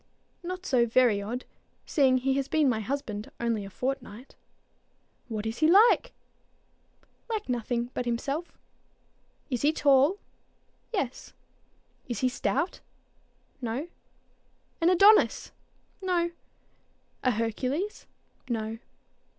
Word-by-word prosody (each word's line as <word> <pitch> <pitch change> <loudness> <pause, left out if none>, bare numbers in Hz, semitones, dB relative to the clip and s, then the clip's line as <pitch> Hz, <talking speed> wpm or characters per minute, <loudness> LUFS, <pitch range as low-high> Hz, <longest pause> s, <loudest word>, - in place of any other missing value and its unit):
"Not 365 +1 -6
so 245 -6 +3
very 230 -3 +3
odd, 240 +5 -5 0.4
seeing 265 -4 +3
he 265 +1 +1
has 275 0 -1
been 310 -2 +2
my 235 -4 +1
husband 220 -3 -4
only 230 -3 -1
a 195 - -8
fortnight." 255 +1 -5 0.9
"What 220 -3 -4
is 225 +1 -3
he 315 - +4
like?" 455 +6 +5 1.2
"Like 435 -2 -3
nothing 240 0 -2
but 250 - -3
himself." 275 +8 -3 0.9
"Is 250 - -1
he 295 - +4
tall?" 285 +4 +4 0.7
"Yes." 280 - -3 0.8
"Is 240 - -3
he 255 - +3
stout?" 250 - -1 0.8
"No." 250 +8 -3 0.9
"An 330 - +5
Adonis?" 405 +4 +5 0.5
"No." 350 -2 0 0.9
"A 255 - +3
Hercules?" 255 - -2 0.4
"No." 225 -1 -3
255 Hz, 110 wpm, -28 LUFS, 230-325 Hz, 1.2 s, like